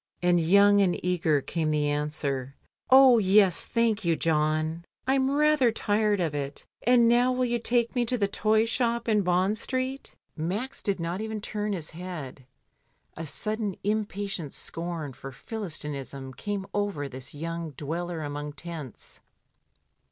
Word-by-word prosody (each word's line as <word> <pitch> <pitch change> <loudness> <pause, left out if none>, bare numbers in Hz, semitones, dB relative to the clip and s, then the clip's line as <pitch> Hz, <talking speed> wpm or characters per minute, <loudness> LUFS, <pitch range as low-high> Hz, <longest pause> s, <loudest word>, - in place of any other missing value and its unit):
And 175 0 +4
young 200 +4 +5
and 180 -3 +2
eager 165 -5 +2
came 160 +2 -2
the 150 -1 +1
answer, 145 -2 -2 0.3
"Oh, 260 -2 +8
yes, 195 -2 +4
thank 230 -2 +1
you, 170 -2 +2
John, 155 +1 0 0.2
Fm 270 +1 +2
rather 300 -5 +4
tired 210 -2 +1
of 165 -4 0
it, 140 -1 -5 0.2
and 240 -1 +5
now 245 +2 +4
will 255 0 +1
you 240 -1 0
take 235 0 +1
me 245 -2 +1
to 250 +2 0
the 200 -3 +1
toy 215 +2 +2
shop 235 0 0
in 215 -2 +3
Bond 185 +3 +1
Street?" 260 +2 -3 0.2
Max 195 +12 -3
did 195 -3 -1
not 170 +4 -3
even 220 0 -4
turn 210 0 -3
his 165 -5 -4
head, 160 -7 -8 0.7
a 165 - -5
sudden 205 +7 -2
im 210 +1 0
patient 195 -8 -5
scorn 165 -4 -5
for 135 +2 -9
Philistinism 140 - -6
came 200 +5 -4
over 205 -9 -1
this 130 +1 -8
young 165 +2 -4
dweller 165 +3 -4
among 145 0 -5
tents. 155 -6 -8
185 Hz, 150 wpm, -27 LUFS, 155-220 Hz, 0.7 s, Oh